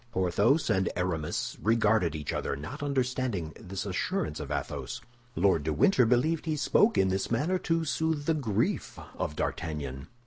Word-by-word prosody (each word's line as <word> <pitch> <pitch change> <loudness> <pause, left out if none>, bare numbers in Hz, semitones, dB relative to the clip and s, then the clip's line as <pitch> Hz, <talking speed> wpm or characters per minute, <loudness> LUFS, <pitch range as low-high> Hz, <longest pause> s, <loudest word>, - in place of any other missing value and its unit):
Porthos 100 - +2
and 95 -3 +2
Aramis 85 -4 -2
regarded 105 -6 +3
each 75 -2 -3
other, - - -2
not 75 - -7
understanding 130 - -1
this 95 +2 -5
assurance 100 - -2
of - - -6
Athos. 65 -3 -4 0.4
Lord 95 -3 +3
de 75 +1 -1
Winter 125 - +4
believed 150 +8 +2
he 155 - +1
spoke 210 +9 +3
in 95 - +4
this 95 +1 -1
manner 150 +11 +1
to 165 -1 0
soothe 155 +1 0
the 160 - +3
grief 125 -10 -1 0.2
of 75 - -3
D'Artagnan. 70 -7 -3
105 Hz, 160 wpm, -29 LUFS, -, 0.4 s, Winter